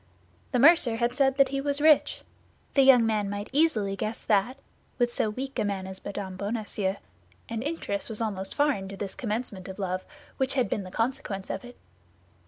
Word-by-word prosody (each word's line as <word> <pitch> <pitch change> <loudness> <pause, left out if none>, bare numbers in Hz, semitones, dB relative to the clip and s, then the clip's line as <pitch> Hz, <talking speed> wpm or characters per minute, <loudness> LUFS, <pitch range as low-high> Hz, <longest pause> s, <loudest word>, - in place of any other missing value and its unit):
The 255 - +2
mercer 275 -3 +6
had 235 +1 0
said 270 0 +2
that 275 -1 +5
he 275 0 -2
was 285 0 -1
rich; 305 0 +4 0.5
the 275 - +5
young 260 -3 +7
man 210 -2 0
might 205 +1 -5
easily 230 -10 +2
guess 215 +3 -4
that 215 +5 +2 0.4
with 240 -1 +1
so 215 - +1
weak 265 +5 -5
a - - +2
man 200 -2 -2
as 190 0 -8
M. 195 -2 -5
Bonacieux; 205 -2 -2 0.5
and 230 -1 -3
interest 280 -10 -3
was 220 - -5
almost 195 -4 -3
foreign 285 -10 +1
to 195 0 -8
this 200 -1 -4
commencement 215 -5 -4
of 190 - -7
love, 185 -2 -2 0.3
which 265 0 0
had 250 -6 +1
been 210 - 0
the - - -8
consequence 205 -2 -2
of - - -4
it. 245 0 -12
225 Hz, 190 wpm, -27 LUFS, 200-265 Hz, 0.5 s, young